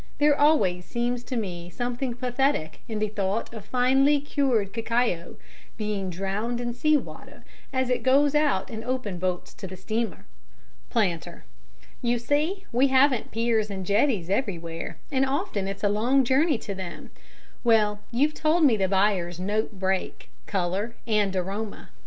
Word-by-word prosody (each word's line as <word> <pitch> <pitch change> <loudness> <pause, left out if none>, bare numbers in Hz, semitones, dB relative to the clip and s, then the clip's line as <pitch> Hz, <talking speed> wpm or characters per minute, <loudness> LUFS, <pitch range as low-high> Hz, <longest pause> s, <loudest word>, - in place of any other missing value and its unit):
There 295 0 +4
always 190 - +3
seems 240 0 -2
to 255 - -3
me 175 -5 -4
something 245 +3 -3
pathetic 250 - 0
in 220 - -3
the 215 0 0
thought 205 +2 -2
of 220 -3 -7
finely 265 +5 +3
cured 260 -8 0
cacao 230 -6 -1 0.4
being 210 -3 -2
drowned 195 +7 -2
in 240 -1 -2
sea 305 +5 +3
water - - -9 0.3
as 260 -1 0
it 250 - +1
goes 275 +2 +4
out 295 -11 +2
in 225 0 -5
open 245 -8 -3
boats 180 -1 -2
to 190 - -8
the 185 0 -9
steamer. 220 +5 -3 0.6
PLANTER: 175 -7 -1 0.6
You 240 -1 +1
see, 305 - 0
we 255 +3 +4
haven't 265 -2 +3
piers 225 -1 +1
and 190 -2 -5
jetties 200 - +2
everywhere, 170 -8 -2
and 265 -1 +2
often 270 - -1
it's 195 +1 -5
a - - +4
long 240 +7 +3
journey 270 +3 +3
to 205 - -6
them. 190 -2 -7 0.5
Well, 215 -3 +3
you've 280 +6 +2
told 315 +2 +2
me 235 -6 +5
the 190 -2 +1
buyers 190 -3 +1
note 210 +4 -1
break, 190 0 -2 0.2
colour 195 +4 -1
and 210 -4 +1
aroma. 200 +4 -4
225 Hz, 155 wpm, -26 LUFS, 195-260 Hz, 0.6 s, me